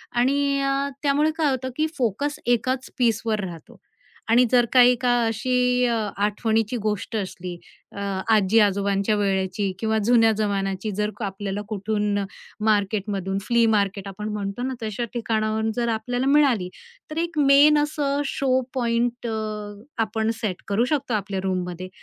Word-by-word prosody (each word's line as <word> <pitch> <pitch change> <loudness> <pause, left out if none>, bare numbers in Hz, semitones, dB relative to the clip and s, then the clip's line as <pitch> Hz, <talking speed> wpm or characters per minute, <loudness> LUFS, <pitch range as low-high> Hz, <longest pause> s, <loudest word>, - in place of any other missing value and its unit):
आणि 275 +3 +2
अ, 275 +1 0
त्यामुळे 290 +2 +3
काय 305 -3 +2
होतं 260 0 -2
की 310 - +2
फोकस 265 +5 -1
एकाच 250 +2 0
पीसवर 225 -2 +1
राहतो. 170 -4 -9 0.5
आणि 235 +2 +6
जर 245 -1 +5
का 255 - +7
एका 245 0 +4
अशी 250 +2 +1
अ, 235 - +1 0.3
आठवणीची 220 +2 0
गोष्ट 210 +1 -2
असली, 185 -3 -4 0.4
अ, 200 - -9 0.3
आजी-आजोबांच्या 200 0 +3
वेळेची 195 -1 0
किंवा 220 0 0
जुन्या 225 -1 +5
जमान्याची, 200 -1 -1
जर 210 0 +1
आपल्याला 200 +1 -4
कुठून 210 0 -1 0.5
मार्केटमधून, 200 -2 0
फ्ली 235 -1 +4
मार्केट 200 -1 -1
आपण 210 +2 -6
म्हणतो 200 +3 -4
ना, 260 0 -2
तशा 220 +2 -3
ठिकाणावरून 220 -1 -1
जर 240 -1 0
आपल्याला 245 +3 -2
मिळाली, 275 -10 +3 0.4
तर 310 - -5
एक 335 -2 -4
मेन 285 +1 +6
असं 290 -1 -1
शो 260 -2 +1
पॉइंट 240 -1 -1
अ, 225 - -2 0.7
आपण 220 0 -2
सेट 195 -6 -3
करू 210 +5 +1
शकतो 275 -4 -1
आपल्या 200 -2 -2
रूममध्ये 185 -1 -3
220 Hz, 140 wpm, -23 LUFS, 200-250 Hz, 0.7 s, का